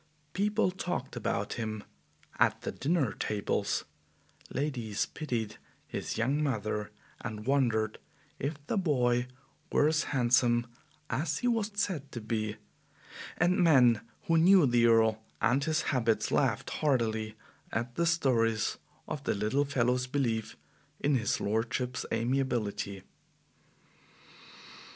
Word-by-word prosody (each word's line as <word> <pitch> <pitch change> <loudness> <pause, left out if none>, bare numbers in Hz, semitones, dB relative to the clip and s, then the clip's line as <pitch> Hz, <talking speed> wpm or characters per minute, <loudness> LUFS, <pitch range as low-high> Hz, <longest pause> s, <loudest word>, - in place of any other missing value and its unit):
People 210 0 +1
talked 175 -8 -4
about 105 -3 -2
him 110 -2 -4 0.6
at - - +3
the - - -3
dinner 150 -5 0
tables, 105 -1 -1 0.6
ladies 120 -7 -2
pitied 115 -8 -4 0.3
his - - -4
young 135 +6 +1
mother, 110 -6 -1 0.3
and 105 0 -5
wondered 115 -6 +1 0.4
if 145 +4 -2
the 200 - 0
boy 125 -7 +2 0.4
were 145 - +4
as 160 0 +1
handsome 120 -2 +3 0.5
as 150 +2 0
he 245 - -1
was 225 -3 +1
said 175 -9 -2
to 120 - -4
be, 110 -1 -2 0.8
and 175 +2 +3
men 125 -9 +5 0.2
who 165 -1 +3
knew 180 0 +7
the 120 -2 +4
Earl 110 -1 +4 0.2
and 135 +4 +2
his 160 -1 +1
habits 115 -4 +1
laughed - - +1
heartily 110 -6 0 0.4
at 120 +2 -2
the 170 +6 +1
stories 115 -10 +1 0.3
of 140 - -5
the - - +1
little 110 +8 +1
fellow's 125 -2 +1
belief 120 -5 -1 0.4
in 145 - +1
his 115 -5 +1
lordship's 115 +4 -1
amiability. 115 -5 -1
125 Hz, 120 wpm, -30 LUFS, 110-145 Hz, 0.8 s, knew